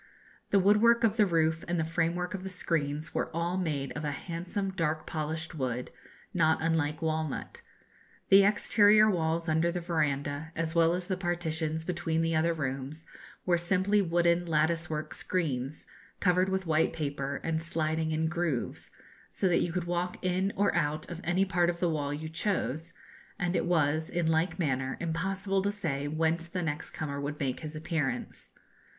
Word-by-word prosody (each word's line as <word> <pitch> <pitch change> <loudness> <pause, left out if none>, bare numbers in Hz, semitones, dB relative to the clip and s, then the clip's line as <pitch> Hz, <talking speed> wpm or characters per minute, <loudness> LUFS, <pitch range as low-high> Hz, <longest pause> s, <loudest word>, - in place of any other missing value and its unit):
The 200 - +4
woodwork 210 +5 +5
of 225 -1 +3
the 210 -2 +5
roof 160 -2 +1
and 175 0 0
the - - +2
framework 170 +2 -1
of 195 - -4
the 190 - -5
screens 155 -4 -1
were - - -1
all 170 +2 0
made 150 -7 -2
of 150 - -5
a 150 - -1
handsome 175 +6 -3
dark 160 -4 -1
polished 160 +1 -3
wood, 125 -4 -3 0.4
not 160 -3 +3
unlike 160 -1 0
walnut. 155 -2 -2 0.7
The 195 +1 +8
exterior 210 +1 +5
walls 165 -1 0
under 160 +2 +2
the 180 - -2
verandah, 155 -2 -1
as 165 0 -2
well 170 0 +4
as 180 0 -2
the 185 -1 -2
partitions 160 -3 -1
between 165 -2 -1
the 165 0 +1
other 160 +2 +3
rooms, 140 +2 -4 0.4
were 175 -2 +3
simply 190 +4 +2
wooden 170 -1 +2
lattice 165 +2 +1
work 155 -1 -3
screens, 145 -6 -2 0.3
covered 185 0 +3
with 190 0 -1
white 160 -1 +2
paper, 140 -2 -3
and 160 -1 -1
sliding 160 -1 -1
in 160 +1 +1
grooves; 170 -7 -2 0.4
so 190 - 0
that 170 - +3
you 175 - 0
could 180 +1 -1
walk 175 +1 -2
in 185 +2 +1
or 200 0 +2
out 150 +1 0
at 175 0 -6
any 185 +2 +2
part 175 -3 +2
of 170 0 -2
the 175 -2 +1
wall 145 -2 -1
you 150 +2 -4
chose, 165 -2 -2 0.5
and 180 -2 -1
it - - +1
was, 155 -2 +2
in 175 -1 -1
like 160 +2 +1
manner, 135 -6 -1
impossible 195 +4 -1
to 200 - 0
say 155 -9 -2
whence 160 +2 0
the 180 +1 -3
next 150 -2 -3
comer 140 -2 -4
would 145 +1 -4
make 135 -3 -1
his 155 -1 -7
appearance. 155 -5 -3
165 Hz, 175 wpm, -30 LUFS, 155-180 Hz, 0.7 s, The